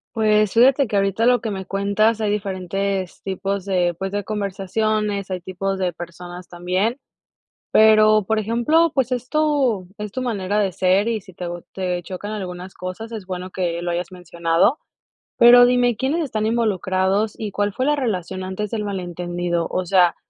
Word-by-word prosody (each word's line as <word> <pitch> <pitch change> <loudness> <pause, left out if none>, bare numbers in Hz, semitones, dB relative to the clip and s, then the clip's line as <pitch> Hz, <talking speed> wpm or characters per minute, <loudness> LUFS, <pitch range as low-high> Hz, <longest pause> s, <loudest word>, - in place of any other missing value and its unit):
Pues, 215 -2 +3
fíjate 260 +3 +5
que 210 - -3
ahorita 195 +3 +1
lo 245 0 +4
que 220 - -3
me 190 -2 -5
cuentas 200 +3 +1
hay 210 -1 +1
diferentes 195 -1 -3
tipos 195 0 -3
de, 180 -3 +1
pues, 195 0 -4
de 205 0 -1
conversaciones, 205 0 -2
hay 185 -1 -3
tipos 190 +2 -3
de 185 -2 0
personas 175 +1 -9
también. 185 +7 -1 0.7
Pero, 215 -1 +6
por 220 +2 +1
ejemplo, 240 +10 +2
pues, 265 -2 +1
es 250 0 -3
tu 280 - +1
es 210 -1 -5
tu 255 - -3
manera 205 -4 -1
de 195 -2 +1
ser 185 +4 +2
y 225 -2 -1
si 185 -2 -16
teo 175 -1 -6
te 180 -2 -2
chocan 190 +4 -7
algunas 185 -2 -6
cosas, 185 +5 -7
es 215 -5 -7
bueno 185 0 -5
que 175 -3 -2
lo 175 - -1
hayas 175 +1 -3
mencionado. 170 - +1 0.6
Pero, 245 +1 +8
dime, 245 -1 +3
¿quiénes 275 +8 -1
están 220 -8 -2
involucrados, 205 -2 0
y 215 -2 -4
cuál 205 +1 0
fue 255 +6 -2
la 295 +1 +3
relación 190 - -3
antes 190 +3 -4
del 215 0 -3
malentendido? 175 -3 -3
O 185 - -2
sea, 180 -1 +4
200 Hz, 175 wpm, -21 LUFS, 185-220 Hz, 0.7 s, Pero